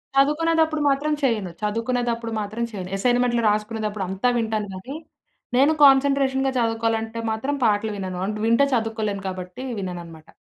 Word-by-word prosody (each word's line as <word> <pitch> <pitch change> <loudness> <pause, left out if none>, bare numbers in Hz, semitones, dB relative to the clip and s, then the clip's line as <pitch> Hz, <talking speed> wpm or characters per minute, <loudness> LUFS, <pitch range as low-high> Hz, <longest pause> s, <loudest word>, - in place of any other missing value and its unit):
చదువుకునేటప్పుడు 315 +2 +2
మాత్రం 290 +2 +1
చేయను. 215 -8 0
చదువుకునేటప్పుడు 230 +1 -1
మాత్రం 215 +3 -4
చేయను. 185 -3 -6
అసైన్‌మెంట్లు 245 +2 +2
రాసుకునేదప్పుడు 210 -1 -2
అంతా 195 +6 +1
వింటాను 220 -2 -1
గానీ, 220 +10 -7 0.6
నేను 280 +4 +5
కాన్సంట్రేషన్‌గా 270 -1 +4
చదువుకోవాలంటే 225 0 -1
మాత్రం 265 +7 -2
పాటలు 215 0 +1
వినను. 185 -2 -4
అంటే 215 0 -3
వింటే 230 +5 +4
చదువుకోలేను 220 -3 -2
కాబట్టి 185 +5 -6 0.2
వినననమాట. 170 -4 -7
225 Hz, 125 wpm, -23 LUFS, 205-265 Hz, 0.6 s, నేను